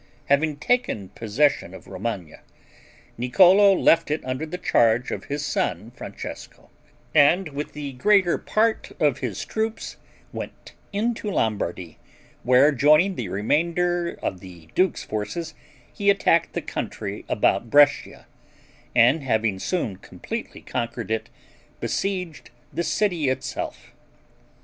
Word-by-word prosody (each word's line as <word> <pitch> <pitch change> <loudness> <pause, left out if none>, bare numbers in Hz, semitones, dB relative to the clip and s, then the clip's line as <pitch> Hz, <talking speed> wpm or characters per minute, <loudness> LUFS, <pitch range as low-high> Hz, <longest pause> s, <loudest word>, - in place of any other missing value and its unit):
Having 145 +1 +2
taken 150 - 0
possession 115 -1 0
of - - -12
Romagna, 95 -4 -5 0.8
Niccolo 185 +11 +6
left 165 -3 +3
it 150 -2 -2
under 130 +5 -3
the 180 - -5
charge 120 -6 +2
of - - -5
his 145 +1 -3
son, 110 - -2
Francesco, - - -9 0.4
and 160 +4 +4
with 145 +1 -6
the 145 -2 -5
greater 190 +6 +3
part 220 +1 0
of - - +2
his - - -4
troops, 220 +1 -3 0.4
went - - -8 0.2
into 220 +1 -1
Lombardy, 100 - -2 0.4
where 130 +5 +5
joining 150 +7 +4
the 115 - -5
remainder 170 - 0
of 90 - -2
the 85 -3 -13
duke's 185 0 +1
forces, 155 +10 -4 0.4
he 200 0 +1
attacked 195 -4 +3
the - - -3
country 100 +1 -5
about 105 +2 +1
Brescia, 145 +2 +3 0.7
and 125 +6 +5
having 110 -6 0
soon 115 - -2
completely - - -7
conquered 115 -1 -4
it, 110 - -2 0.5
besieged 180 -5 -3 0.2
the - - -1
city 170 -4 0
itself. 130 - -4
145 Hz, 120 wpm, -24 LUFS, 110-175 Hz, 0.8 s, Niccolo